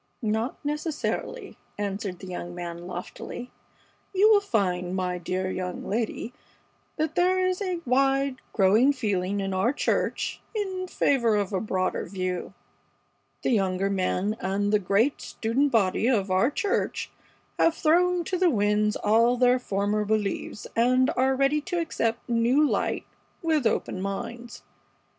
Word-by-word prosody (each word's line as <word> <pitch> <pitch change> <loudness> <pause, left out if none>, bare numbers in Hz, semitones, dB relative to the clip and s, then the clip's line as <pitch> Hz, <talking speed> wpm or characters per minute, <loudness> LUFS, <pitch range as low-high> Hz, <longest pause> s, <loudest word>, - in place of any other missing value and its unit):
"Not 220 +7 -2
necessarily," 300 +10 -3 0.2
answered 200 -2 -3
the 190 - -10
young 175 -1 -6
man, 175 0 -6
loftily. 185 +7 -7 0.6
"You 415 +3 +6
will 410 -2 +6
find, 185 - 0
my 180 -1 -1
dear 185 +2 -2
young 180 -1 -4
lady, 225 +2 -2 0.6
that 315 0 -1
there 370 +2 +2
is 370 +2 -1
a 365 -3 -2
wide, 270 +1 +2
growing 220 +7 +4
feeling 200 -6 -1
in 195 -1 -2
our 190 +6 +2
church 290 - -1
in 380 -3 -2
favor 240 -10 +2
of 205 -1 -1
a 190 - 0
broader 185 -3 -1
view. 185 0 -4 0.9
The - - +1
younger 195 -3 +1
men, 195 +2 0
and 200 +2 -1
the 210 - +5
great 205 +8 +1
student 255 +5 0
body 215 -1 +2
of 205 -7 +1
our 190 +7 +3
church, 390 +7 -1 0.5
have 330 - +4
thrown 355 +2 +3
to 365 +2 -2
the 365 -1 +4
winds 210 -3 +2
all 230 +4 +3
their 250 0 +4
former 205 -1 0
beliefs 210 -1 -2
and 255 +3 +3
are 265 +1 +2
ready 275 +3 +2
to 355 +3 -2
accept 230 -8 -2
new 240 +6 +3
light - - -1 0.4
with 310 -7 +2
open 185 - -1
minds. 235 +5 -5
225 Hz, 145 wpm, -26 LUFS, 195-280 Hz, 0.9 s, You